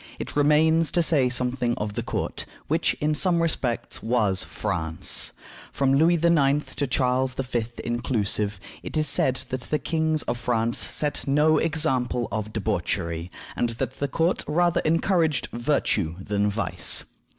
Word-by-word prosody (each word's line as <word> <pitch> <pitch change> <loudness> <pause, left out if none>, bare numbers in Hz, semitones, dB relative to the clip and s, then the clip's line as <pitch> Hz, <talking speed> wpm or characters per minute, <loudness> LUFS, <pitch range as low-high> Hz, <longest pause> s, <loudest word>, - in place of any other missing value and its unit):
It - - -6
remains 155 +2 +4
to 175 - +3
say 140 -6 +4
something 125 -1 0
of 105 0 -4
the - - -3
court, - - -4 0.2
which, - - +1
in 150 +1 0
some 170 +2 +2
respects, 140 -8 -1
was 110 -5 +1
France. 85 -6 0 0.4
From 135 -1 +1
Louis 160 +5 +4
IX. 150 -4 +2
to 140 - -2
Charles 130 0 +1
V. 125 -4 -2 0.2
inclusive, 110 -4 -1 0.2
it - - -5
is 155 0 +2
said 130 -1 +1
that 130 0 -3
the 155 - +1
kings 160 -1 0
of 120 0 -3
France 120 -1 0
set 150 -1 0
no 150 +3 +3
example 135 -7 0
of 110 +1 -3
debauchery, 90 -5 -2 0.3
and 120 - 0
that 130 - -4
the 140 - 0
court 165 +6 0
rather 175 +3 +2
encouraged 165 -1 +1
virtue 115 - 0
than 100 +1 0
vice. 105 +3 0
130 Hz, 150 wpm, -25 LUFS, 110-155 Hz, 0.4 s, remains